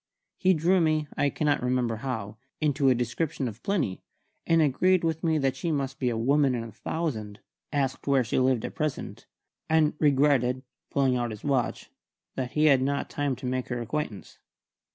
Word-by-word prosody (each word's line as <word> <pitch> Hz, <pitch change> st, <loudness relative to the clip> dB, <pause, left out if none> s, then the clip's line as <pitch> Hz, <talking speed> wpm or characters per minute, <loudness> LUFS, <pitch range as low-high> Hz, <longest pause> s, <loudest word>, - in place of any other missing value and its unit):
He 185 Hz, -1 st, +4 dB
drew 175 Hz, +4 st, +3 dB
me 155 Hz, -2 st, +1 dB
(I 145 Hz, -, +2 dB
cannot 145 Hz, 0 st, 0 dB
remember 125 Hz, -2 st, 0 dB
how) 110 Hz, -4 st, -4 dB, 0.2 s
into 145 Hz, -3 st, +2 dB
a 130 Hz, -, +4 dB
description 125 Hz, +3 st, -2 dB
of 110 Hz, -1 st, -8 dB
Plinny, 180 Hz, -, -1 dB, 0.5 s
and 165 Hz, 0 st, +4 dB
agreed 170 Hz, +5 st, +3 dB
with 160 Hz, -1 st, -1 dB
me 160 Hz, -2 st, +2 dB
that 135 Hz, -3 st, +1 dB
she 165 Hz, +5 st, -2 dB
must 135 Hz, -2 st, -2 dB
be 125 Hz, -, +1 dB
a 115 Hz, -, -2 dB
woman 135 Hz, +3 st, +3 dB
in 115 Hz, -, -3 dB
a 115 Hz, -, -8 dB
thousand; 110 Hz, -10 st, -4 dB, 0.3 s
asked 135 Hz, -2 st, -1 dB
where 135 Hz, -2 st, +4 dB
she 115 Hz, -, 0 dB
lived 130 Hz, -3 st, +2 dB
at -, -, -5 dB
present, 155 Hz, -2 st, -4 dB, 0.4 s
and 160 Hz, -1 st, +3 dB
regretted 135 Hz, -3 st, +3 dB, 0.3 s
pulling 135 Hz, -2 st, +2 dB
out 120 Hz, -1 st, -1 dB
his 105 Hz, -2 st, -8 dB
watch 135 Hz, -4 st, -1 dB, 0.4 s
that 125 Hz, -2 st, -3 dB
he 155 Hz, 0 st, +3 dB
had 135 Hz, -4 st, +5 dB
not 140 Hz, +1 st, -1 dB
time 145 Hz, -2 st, -1 dB
to 130 Hz, -, -9 dB
make 130 Hz, 0 st, -2 dB
her 120 Hz, -1 st, -3 dB
acquaintance. 120 Hz, -3 st, -5 dB
135 Hz, 185 wpm, -27 LUFS, 125-150 Hz, 0.5 s, had